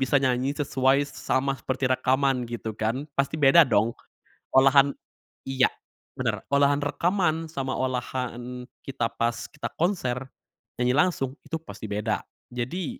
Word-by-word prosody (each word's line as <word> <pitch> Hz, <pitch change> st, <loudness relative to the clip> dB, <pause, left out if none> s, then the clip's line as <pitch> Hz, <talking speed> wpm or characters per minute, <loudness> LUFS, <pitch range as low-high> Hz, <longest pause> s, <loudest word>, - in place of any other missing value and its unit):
bisa 135 Hz, +2 st, +3 dB
nyanyi 130 Hz, +1 st, +1 dB
sesuai 135 Hz, -1 st, +2 dB
sa 135 Hz, -, -2 dB
sama 135 Hz, +1 st, 0 dB
seperti 130 Hz, +1 st, -2 dB
rekaman 130 Hz, 0 st, +1 dB
gitu 115 Hz, -2 st, -4 dB
kan, 115 Hz, +6 st, -1 dB
pasti 140 Hz, +3 st, +1 dB
beda 145 Hz, +5 st, +8 dB
dong 110 Hz, +2 st, +3 dB, 0.7 s
olahan 135 Hz, +1 st, +6 dB, 0.6 s
iya, 135 Hz, -1 st, +3 dB, 0.5 s
bener. -, -, -1 dB
Olahan 140 Hz, +1 st, +3 dB
rekaman 165 Hz, +1 st, 0 dB
sama 130 Hz, -3 st, -3 dB
olahan 125 Hz, -1 st, -3 dB, 0.2 s
kita, 130 Hz, -4 st, -1 dB
pas 120 Hz, 0 st, -1 dB
kita 150 Hz, -, -6 dB
konser, 135 Hz, -9 st, 0 dB, 0.5 s
nyanyi 125 Hz, 0 st, +3 dB
langsung, 145 Hz, -5 st, +1 dB
itu -, -, -4 dB
pasti 105 Hz, -6 st, -8 dB
beda. 105 Hz, +2 st, -1 dB, 0.3 s
Jadi 130 Hz, +8 st, -4 dB
130 Hz, 135 wpm, -26 LUFS, 125-140 Hz, 0.7 s, beda